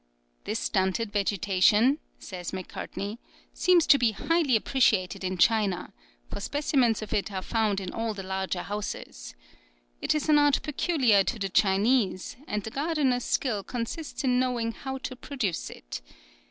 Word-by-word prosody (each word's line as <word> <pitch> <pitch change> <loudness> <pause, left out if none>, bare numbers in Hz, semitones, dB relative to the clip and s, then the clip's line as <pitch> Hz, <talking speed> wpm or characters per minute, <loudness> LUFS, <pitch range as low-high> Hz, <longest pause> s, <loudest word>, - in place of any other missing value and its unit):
"This - - -2
stunted 190 +3 0
vegetation," 205 - +3 0.2
says 180 -3 -7
Macartney, 200 +3 -6 0.3
"seems 360 -3 +4
to 280 - +6
be 230 -3 +2
highly 320 +2 +2
appreciated 215 -6 +2
in 185 0 -2
China, 200 -2 +2 0.3
for - - -6
specimens 255 -2 +1
of 215 - -6
it 205 +1 -1
are 190 -1 -4
found 215 -3 0
in 185 -2 -6
all 225 -1 -2
the 195 - -6
larger 190 -1 -3
houses. 205 - -6 0.7
It - - +1
is 305 - -1
an 300 -1 +6
art 290 -1 +3
peculiar 270 - +3
to 235 - -2
the 195 -2 -2
Chinese, 195 +1 +2
and 210 -1 -2
the 220 - -6
gardener's 280 -4 0
skill 225 -7 0
consists 250 +9 -5
in 250 -2 +2
knowing 245 -3 0
how 265 +3 -6
to 260 0 -6
produce 250 - -3
it. - - -8
220 Hz, 155 wpm, -27 LUFS, 195-265 Hz, 0.7 s, to